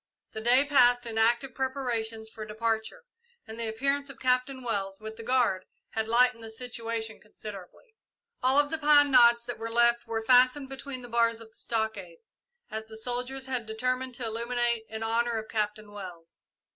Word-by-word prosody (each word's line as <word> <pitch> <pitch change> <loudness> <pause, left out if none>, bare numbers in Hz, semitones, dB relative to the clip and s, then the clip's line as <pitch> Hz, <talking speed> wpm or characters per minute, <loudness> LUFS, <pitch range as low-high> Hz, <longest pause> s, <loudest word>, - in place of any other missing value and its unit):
The 220 - -6
day 250 +5 +4
passed 245 -4 +4
in 225 -1 -3
active 235 +3 +2
preparations 240 -5 -2
for 220 0 -8
departure, 220 - -2 0.4
and 220 +1 -9
the 230 - -2
appearance 275 +5 -1
of 275 - -11
Captain 255 +1 +1
Wells, 195 -4 -3
with 220 0 -8
the 230 - -9
guard, 230 -6 +1 0.2
had 220 0 -2
lightened 240 0 +3
the 225 - -7
situation 230 -1 -5
considerably. 210 - -11 0.5
All 260 +2 +3
of 290 +1 +1
the 320 - -1
pine 290 -1 +5
knots 235 -2 +6
that 245 -2 -5
were 225 0 -4
left 235 +1 +3
were 225 -1 -3
fastened 255 +3 +5
between 270 -1 -7
the - - -6
bars 230 -1 +2
of 225 -1 -11
the - - -20
stockade, 225 - -3 0.5
as 220 0 -4
the 220 0 -10
soldiers 250 +3 -3
had 255 -4 -3
determined 255 +3 -2
to 240 - -4
illuminate 235 0 -1
in 220 0 -5
honour 230 +1 0
of 220 0 -5
Captain 210 -1 -3
Wells. 180 -5 -10
235 Hz, 180 wpm, -28 LUFS, 220-255 Hz, 0.5 s, knots